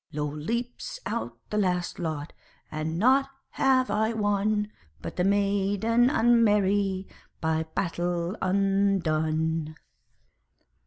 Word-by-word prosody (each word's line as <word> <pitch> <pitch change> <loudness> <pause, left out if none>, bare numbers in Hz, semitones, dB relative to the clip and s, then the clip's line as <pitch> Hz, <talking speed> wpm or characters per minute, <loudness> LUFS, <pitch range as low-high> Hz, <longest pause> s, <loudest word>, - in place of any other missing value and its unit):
Lo! 150 0 -2
leaps 235 - -4
out - - -3
the 210 - +1
last 180 -3 -1
lot 155 -3 -4 0.4
and 155 +1 -3
nought 265 +7 +4 0.2
have 255 -4 +2
I 220 +2 +1
won, 210 0 0 0.3
But - - -7
the 180 - 0
maiden 205 +4 +2
unmerry, 205 -6 +3 0.3
by 160 0 0
battle 175 0 -1
undone. 165 -5 +1
195 Hz, 100 wpm, -27 LUFS, 165-215 Hz, 0.4 s, nought